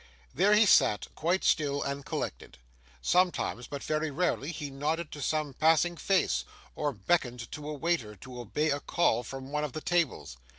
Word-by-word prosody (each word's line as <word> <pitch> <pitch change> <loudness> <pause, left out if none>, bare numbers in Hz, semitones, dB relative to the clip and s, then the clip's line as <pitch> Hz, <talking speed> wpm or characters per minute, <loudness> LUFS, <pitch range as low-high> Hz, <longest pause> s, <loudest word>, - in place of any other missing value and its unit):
There 195 +8 +4
he 215 +1 +6
sat, 105 - +4
quite 175 +4 0
still 145 -2 +2
and 140 0 -3
collected. - - -5 0.5
Sometimes, 175 -9 +1
but 140 -1 -6
very 155 0 -1
rarely, 155 -1 -1
he 150 -3 -6
nodded 150 +4 -2
to 145 - -7
some 155 -1 -1
passing 165 +4 +3
face, 190 +2 +1 0.3
or 150 -1 -1
beckoned 125 - -1
to 150 0 -6
a - - -3
waiter 145 -9 -1
to 125 +5 -10
obey 150 +7 0
a 145 - 0
call 140 -6 +1
from 135 +3 -8
one 150 0 -1
of 150 -4 -3
the - - -3
tables. 155 - -1
150 Hz, 175 wpm, -29 LUFS, 135-170 Hz, 0.5 s, he